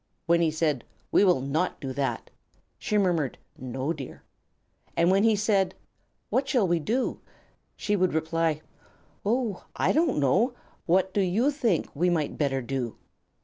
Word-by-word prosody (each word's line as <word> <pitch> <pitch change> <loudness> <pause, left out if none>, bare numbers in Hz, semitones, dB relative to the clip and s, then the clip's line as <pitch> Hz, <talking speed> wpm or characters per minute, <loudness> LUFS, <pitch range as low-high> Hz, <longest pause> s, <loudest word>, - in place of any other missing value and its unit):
When 170 0 +3
he 165 - +3
said, 155 -5 0 0.3
"We - - +5
will 180 -9 +4
not 150 +7 -1
do 135 -2 -5
that," 135 0 -2 0.5
she 210 - 0
murmured, 175 -9 +1 0.2
"No, 130 +4 -3
dear." 140 -5 -9 0.7
And 170 +2 +4
when 195 +1 +4
he 225 -1 +4
said, 200 -2 +1 0.6
"What 270 +1 +1
shall 245 -7 +3
we 170 -1 +2
do?" 235 - -1 0.5
she 210 - -1
would 185 -4 +1
reply, 160 -1 0 0.6
"Oh, 225 -2 -1
I - - +2
don't 315 -2 +2
know. 190 - +2 0.3
What 185 +2 +2
do 205 - +2
you 210 +10 +2
think 235 - 0
we 175 +5 +2
might 160 -4 0
better 135 -3 0
do?" 120 -2 -3
175 Hz, 155 wpm, -27 LUFS, 150-205 Hz, 0.7 s, We